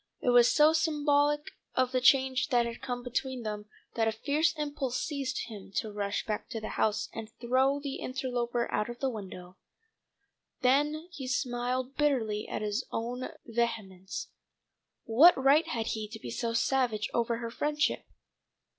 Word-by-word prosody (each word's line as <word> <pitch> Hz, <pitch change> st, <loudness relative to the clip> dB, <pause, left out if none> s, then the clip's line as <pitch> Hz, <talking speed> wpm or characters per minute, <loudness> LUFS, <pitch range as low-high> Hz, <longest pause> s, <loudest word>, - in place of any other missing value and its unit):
It -, -, 0 dB
was 245 Hz, -1 st, +6 dB
so 305 Hz, +1 st, +5 dB
symbolical 295 Hz, -2 st, +2 dB, 0.2 s
of 255 Hz, -1 st, +2 dB
the 255 Hz, -1 st, +1 dB
change 265 Hz, +1 st, +4 dB
that 245 Hz, -4 st, +3 dB
had 235 Hz, 0 st, -6 dB
come 245 Hz, -2 st, -4 dB
between 250 Hz, 0 st, -3 dB
them 210 Hz, -1 st, -5 dB, 0.3 s
that 225 Hz, -1 st, +1 dB
a -, -, +2 dB
fierce 290 Hz, +9 st, +1 dB
impulse 285 Hz, -4 st, -2 dB
seized 275 Hz, -4 st, -2 dB
him 205 Hz, -4 st, -10 dB
to 215 Hz, -, -1 dB
rush 205 Hz, 0 st, -2 dB
back 210 Hz, -1 st, -3 dB
to 230 Hz, -, -4 dB
the 215 Hz, -, -6 dB
house 215 Hz, -1 st, 0 dB
and 225 Hz, -1 st, -6 dB
throw 260 Hz, +3 st, +2 dB
the 280 Hz, -1 st, -4 dB
interloper 245 Hz, -2 st, -2 dB
out 210 Hz, -, 0 dB
of 240 Hz, -, -6 dB
the 265 Hz, +1 st, -1 dB
window. 190 Hz, -4 st, -9 dB, 1.0 s
Then 295 Hz, +5 st, +2 dB
he 270 Hz, -7 st, -7 dB
smiled 255 Hz, 0 st, -1 dB
bitterly 230 Hz, -8 st, +1 dB
at -, -, -4 dB
his 210 Hz, +4 st, -1 dB
own 245 Hz, +3 st, -3 dB, 0.2 s
vehemence. 220 Hz, -5 st, -3 dB, 0.7 s
What 285 Hz, +11 st, +7 dB
right 275 Hz, +4 st, +4 dB
had 230 Hz, -2 st, -2 dB
he 215 Hz, -1 st, -4 dB
to 220 Hz, +1 st, -9 dB
be -, -, -7 dB
so 230 Hz, -1 st, -2 dB
savage 235 Hz, -3 st, +1 dB
over 235 Hz, 0 st, +1 dB
her 230 Hz, 0 st, -5 dB
friendship? 295 Hz, +4 st, 0 dB
245 Hz, 165 wpm, -30 LUFS, 225-275 Hz, 1.0 s, What